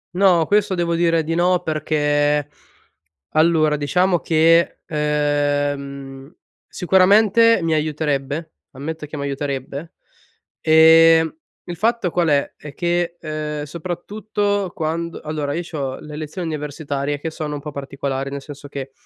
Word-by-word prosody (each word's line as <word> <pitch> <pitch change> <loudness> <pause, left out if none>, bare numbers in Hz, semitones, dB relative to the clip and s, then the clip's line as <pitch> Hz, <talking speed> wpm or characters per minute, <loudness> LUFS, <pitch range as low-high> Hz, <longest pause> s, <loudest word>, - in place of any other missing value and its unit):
No, 180 -4 +4
questo 205 -1 +2
devo 170 -1 0
dire 165 -1 +2
di 165 +2 -2
no 180 +1 +2
perché, 145 -2 +1 0.8
allora 155 -1 +3
,diciamo 175 +5 +1
che, 165 +1 +3
ehm, 145 -2 -1 0.4
sicuramente, 205 +5 +4
mi 160 -1 +1
aiuterebbe, 150 0 -2 0.2
ammetto 150 +3 -6
che 150 - -8
mi 140 - -4
aiuterebbe, 140 +2 -4 0.7
ehm, 160 0 +6 0.3
il 175 -1 -6
fatto 225 -1 0
qual 175 -2 +1
è? 145 -2 +1
È 150 -2 -11
che, 175 0 -1
uhm, 155 -1 -4
soprattutto 200 +5 -3
quando 165 +1 -3
allora, 150 -2 -3
io 170 +4 -2
c'ho 140 -6 -5
le 150 0 -10
lezioni 155 +3 -5
universitarie 145 -1 -3
che 160 +3 -4
sono 150 -2 -4
un - - -6
po' 150 - -7
particolari, 135 -1 -4
nel 140 0 -6
senso 145 0 -10
che 135 -1 -7
155 Hz, 130 wpm, -20 LUFS, 145-170 Hz, 0.8 s, ehm